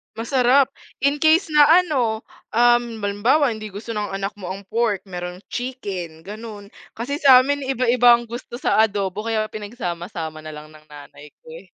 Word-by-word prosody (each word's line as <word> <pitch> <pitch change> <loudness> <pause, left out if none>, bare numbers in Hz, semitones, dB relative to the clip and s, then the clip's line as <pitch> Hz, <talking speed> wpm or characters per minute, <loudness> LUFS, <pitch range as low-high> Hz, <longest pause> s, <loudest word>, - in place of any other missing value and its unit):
Masarap, 255 +3 +3 0.3
in 280 +1 +2
case 320 +3 +3
na 300 -1 +6 0.2
ano, 240 -10 -1 0.3
um, 240 -1 +2
halimbawa 225 +8 +2
hindi 215 -2 -7
gusto 210 +4 -9
ng 205 -2 -3
anak 195 +1 -3
mo 195 - -9
ang 195 - -9
pork, 225 -4 0
merong 180 0 -6
chicken, 195 -11 -5
gano'n. 210 +1 -9 0.2
Kasi 275 +6 -4
sa 265 -4 +7
amin, 285 +1 -2
iba-iba 245 -2 +4
ang 235 -1 -1
gusto 240 +1 -8
sa - - +1
adobo 200 0 -4
kaya 220 -1 -1
pinagsama-sama 175 -7 -6
na 155 - -7
lang 150 0 -11
ng 155 0 -18
nanay 150 0 -14
ko, - - -16
eh. 180 - -14
220 Hz, 170 wpm, -21 LUFS, 195-250 Hz, 0.3 s, sa